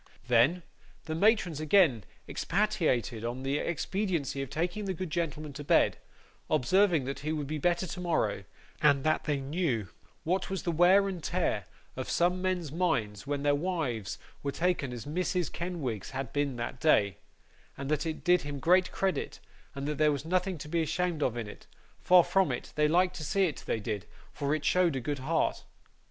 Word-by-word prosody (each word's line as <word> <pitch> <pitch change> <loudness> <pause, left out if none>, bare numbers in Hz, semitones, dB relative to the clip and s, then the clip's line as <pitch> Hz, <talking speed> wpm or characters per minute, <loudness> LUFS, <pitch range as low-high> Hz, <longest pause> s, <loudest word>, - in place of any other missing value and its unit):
Then, 125 +9 +4 0.4
the 160 - -3
matrons 185 -3 +2
again 155 - +4 0.2
expatiated 155 - 0
on 120 +3 -4
the 140 +2 0
expediency 170 -5 -2
of 135 - -5
taking 180 +6 -2
the 190 -1 -2
good 180 -1 -5
gentleman 155 -3 -3
to 145 +1 -7
bed; 165 +3 +3 0.5
observing 175 +3 +3
that 135 +1 -4
he 155 +2 -3
would 150 -2 -2
be 150 +2 -3
better 175 +4 +1
tomorrow, 175 -1 -1 0.4
and 140 -2 +4
that 155 0 +1
they 145 -3 0
knew 135 - -1 0.3
what 180 0 0
was 190 -1 -3
the 170 - 0
wear 180 +4 +5
and 185 -3 -4
tear 160 - -1 0.3
of - - -5
some 180 +1 +2
men's 180 -5 -1
minds 125 - -1
when 145 -1 -2
their 145 0 +3
wives 145 - -2 0.2
were 140 - -2
taken 170 -4 0
as 120 -3 -7
Mrs. 180 +2 -1
Kenwigs 155 - -4
had 135 -2 -5
been 145 -2 0
that 120 +1 -5
day, 105 -10 +3 0.6
and 140 - -5
that 155 +2 0
it 160 - -4
did 180 0 +4
him 145 0 -5
great 180 +5 +3
credit, 190 -1 -2 0.4
and 140 +1 -4
there 150 0 +2
was 145 0 -3
nothing 185 +1 0
to 150 - -8
be 165 +2 0
ashamed 165 +1 -1
of 120 -4 0
in 115 - -3
it; 105 - -12 0.3
far 180 -1 +6
from 190 +1 +2
it; - - -5
they 150 0 +3
liked 180 +3 +2
to 160 - -6
see 195 +6 +1
it, 155 -6 -3
they 115 - 0
did, 105 -2 -4 0.3
for 145 +1 0
it 155 - -5
showed 180 -5 +3
a - - 0
good 140 +3 -3
heart. 155 +5 0
155 Hz, 185 wpm, -30 LUFS, 140-180 Hz, 0.6 s, far